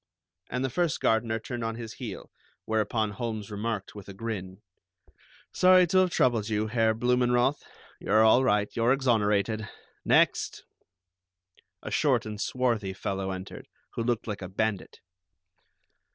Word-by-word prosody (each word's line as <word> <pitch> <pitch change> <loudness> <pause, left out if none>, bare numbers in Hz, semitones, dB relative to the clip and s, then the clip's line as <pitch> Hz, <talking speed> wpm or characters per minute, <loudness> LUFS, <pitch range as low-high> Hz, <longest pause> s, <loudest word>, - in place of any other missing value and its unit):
And 125 +1 -2
the 130 - -3
first 170 +2 0
gardener 115 0 +1
turned 120 +1 -6
on 115 0 -2
his 115 -1 -7
heel, 115 -7 -8 0.3
whereupon 110 0 0
Holmes 110 -2 -5
remarked 105 -1 -4
with 100 -1 -11
a 100 - -9
grin: 95 -2 -6 0.9
"Sorry 185 0 +6
to 185 +2 +3
have 185 -1 +3
troubled 115 -9 +1
you, 105 0 0
Herr 110 0 +1
Blumenroth. 125 +3 +2 0.4
You're 110 +2 +3
all 110 +4 +5
right. 105 -4 +2
You're 120 +2 +3
exonerated. 110 -4 +1 0.3
Next!" - - +2 1.2
A - - -6
short - - +2
and 105 -1 -6
swarthy 115 -7 -1
fellow 95 0 -3
entered, 95 0 -7 0.3
who - - -3
looked 120 -1 -1
like 105 -3 -5
a 90 - -6
bandit. 105 0 -3
110 Hz, 140 wpm, -27 LUFS, 105-120 Hz, 1.2 s, Sorry